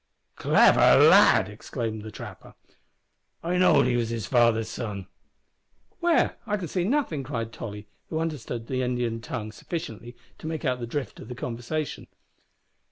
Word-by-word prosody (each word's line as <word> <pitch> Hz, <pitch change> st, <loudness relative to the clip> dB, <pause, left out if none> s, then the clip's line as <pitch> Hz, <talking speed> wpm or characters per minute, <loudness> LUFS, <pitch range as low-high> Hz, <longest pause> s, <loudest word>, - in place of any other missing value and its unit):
"Clever -, -, +5 dB, 0.2 s
lad!" -, -, +7 dB
exclaimed 110 Hz, +1 st, -5 dB
the 110 Hz, -, -8 dB
trapper, -, -, -10 dB, 0.9 s
"I 175 Hz, +2 st, 0 dB
know'd 185 Hz, -, +5 dB
he 125 Hz, -1 st, +1 dB
was 115 Hz, -2 st, 0 dB
his 115 Hz, -3 st, -3 dB
father's 115 Hz, +1 st, +3 dB
son." 105 Hz, -5 st, -5 dB, 0.9 s
"Where? 345 Hz, -2 st, +2 dB
I 210 Hz, -1 st, 0 dB
can 180 Hz, -4 st, -5 dB
see 175 Hz, +2 st, -1 dB
nothing," 235 Hz, -, 0 dB
cried 115 Hz, -4 st, -4 dB
Tolly, 105 Hz, -2 st, -7 dB, 0.2 s
who 160 Hz, -, -3 dB
understood 150 Hz, -8 st, -3 dB
the 130 Hz, +1 st, -2 dB
Indian 120 Hz, -2 st, -1 dB
tongue 110 Hz, -3 st, -5 dB
sufficiently 120 Hz, -2 st, -7 dB, 0.2 s
to -, -, -7 dB
make 160 Hz, -1 st, -4 dB
out 125 Hz, -2 st, 0 dB
the 120 Hz, -, -5 dB
drift 135 Hz, +2 st, -4 dB
of -, -, -10 dB
the 125 Hz, -, -7 dB
conversation. 125 Hz, +6 st, -4 dB
120 Hz, 155 wpm, -26 LUFS, 115-155 Hz, 0.9 s, lad